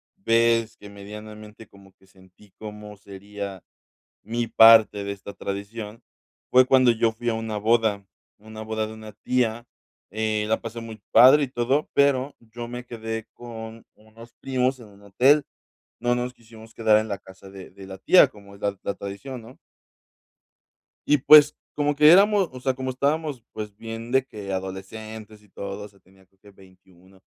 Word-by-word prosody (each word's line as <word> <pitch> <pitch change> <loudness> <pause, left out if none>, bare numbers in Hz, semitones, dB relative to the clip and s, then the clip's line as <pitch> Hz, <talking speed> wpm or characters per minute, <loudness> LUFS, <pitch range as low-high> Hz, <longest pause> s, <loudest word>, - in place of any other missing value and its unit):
vez 115 - +1
que 105 - -13
medianamente 105 +2 -11
como 100 -1 -20
que 95 - -27
sentí 95 +2 -22
cómo 105 -1 -10
sería 100 -1 -9 0.6
mi 115 +2 -3
parte 110 -2 +6
de 100 0 -4
esta 100 0 -10
tradición 105 +3 -7 0.5
fue 130 0 +6
cuando 130 -1 +5
yo 115 0 +1
fui 120 +1 -3
a - - -1
una 110 -1 -4
boda, 110 -1 +1 0.3
una 110 +1 -12
boda 110 0 -3
de 110 - -9
una 110 -1 -11
tía, 120 +1 -1 0.5
eh, 110 +1 -1
la 110 - +1
pasé 115 0 -7
muy 110 -1 -10
padre 135 +4 +7
y - - -7
todo. 130 +4 -1
Pero 140 -1 +2
yo 120 +1 -9
me 125 +1 -7
quedé 115 -2 -6
con 115 -1 -10
unos 110 +2 -17
primos 130 0 -1
en 115 - -12
un 100 0 -20
hotel. 130 +9 +3 0.6
No 120 0 +1
nos 125 0 -3
quisimos 115 -1 -16
quedar 110 -2 +3
en 110 +1 -1
la 100 -2 -4
casa 95 0 -15
de 95 -1 -11
de 95 0 -13
la 95 0 -9
tía, 180 - +6
como 100 -5 -17
es - - -17
la 100 -1 -2
la 100 - -2
tradición, 120 +6 -8
¿no? 115 +4 -15 1.5
Y 150 - +4
pues, 150 +2 +7 0.2
como 145 0 0
que 150 +1 +6
éramos 200 0 +5
o 130 - -10
sea, 130 +1 -1
como 130 0 -5
estábamos, 140 0 -2
pues, 105 -2 -7
bien 115 +1 -8
de 130 0 +3
que 105 -6 -8
adolescentes 105 +3 -7
y 105 - -24
todo. 100 +1 -7
O - - -10
sea, 100 -1 -24
tenía 95 +1 -25
creo 95 +1 -39
que 105 - -17
21. 95 -1 -22
110 Hz, 180 wpm, -24 LUFS, 100-120 Hz, 1.5 s, padre